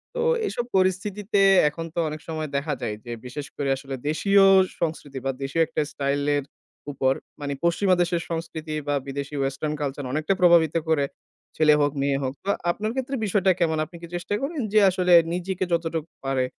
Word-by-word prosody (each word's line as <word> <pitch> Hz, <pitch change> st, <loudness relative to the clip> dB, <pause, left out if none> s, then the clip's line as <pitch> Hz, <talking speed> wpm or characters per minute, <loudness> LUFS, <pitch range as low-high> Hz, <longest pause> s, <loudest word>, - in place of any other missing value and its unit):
তো 485 Hz, -, -1 dB, 0.2 s
এইসব 240 Hz, -11 st, -2 dB
পরিস্থিতিতে 195 Hz, +2 st, +1 dB, 0.3 s
এখন 165 Hz, +2 st, -6 dB
তো -, -, -2 dB
অনেক 155 Hz, 0 st, -7 dB
সময় 155 Hz, -2 st, -4 dB
দেখা 150 Hz, +1 st, -2 dB
যায়, 110 Hz, -3 st, -2 dB
যে 120 Hz, -, -6 dB
বিশেষ 140 Hz, +3 st, -6 dB
করে 140 Hz, -1 st, -2 dB
আসলে 135 Hz, 0 st, -6 dB
দেশীয় 195 Hz, +5 st, +4 dB, 0.4 s
সংস্কৃতি 145 Hz, -5 st, -3 dB
বা 135 Hz, -, +1 dB
দেশীয় 135 Hz, +5 st, 0 dB
একটা 165 Hz, -, -1 dB
স্টাইল 140 Hz, 0 st, -1 dB, 0.2 s
এর 140 Hz, -, -2 dB, 0.5 s
উপর, 130 Hz, -1 st, +1 dB, 0.3 s
মানে 140 Hz, -1 st, -2 dB
পশ্চিমা 185 Hz, +2 st, +3 dB
দেশের 175 Hz, -1 st, 0 dB
সংস্কৃতি 160 Hz, -1 st, -4 dB
বা 145 Hz, -, +1 dB
বিদেশী 140 Hz, +1 st, -5 dB
ওয়েসটার্ন 135 Hz, +3 st, -1 dB
কালচার 140 Hz, -1 st, -3 dB
অনেকটা 155 Hz, +5 st, +1 dB
প্রভাবিত 170 Hz, -3 st, +5 dB
করে, 145 Hz, -3 st, +3 dB, 0.5 s
ছেলে 155 Hz, -1 st, +5 dB
হোক 145 Hz, -1 st, +2 dB
মেয়ে 140 Hz, 0 st, +1 dB
হোক। 130 Hz, 0 st, -2 dB
তো 200 Hz, -, -4 dB, 0.2 s
আপনার 215 Hz, +4 st, -3 dB
ক্ষেত্রে 265 Hz, +1 st, -2 dB
বিষয়টা 195 Hz, -1 st, +3 dB
কেমন? 160 Hz, -2 st, +1 dB
আপনি 170 Hz, -, -16 dB
কি 170 Hz, -, -8 dB
চেষ্টা 175 Hz, +3 st, -3 dB
করেন, 285 Hz, +1 st, -2 dB
যে 215 Hz, -, +7 dB
আসলে 180 Hz, -1 st, +2 dB, 0.2 s
নিজেকে 185 Hz, +1 st, -2 dB
যতটুকু 165 Hz, -1 st, -2 dB
পারে, 135 Hz, -1 st, +1 dB
160 Hz, 180 wpm, -24 LUFS, 140-185 Hz, 0.5 s, যে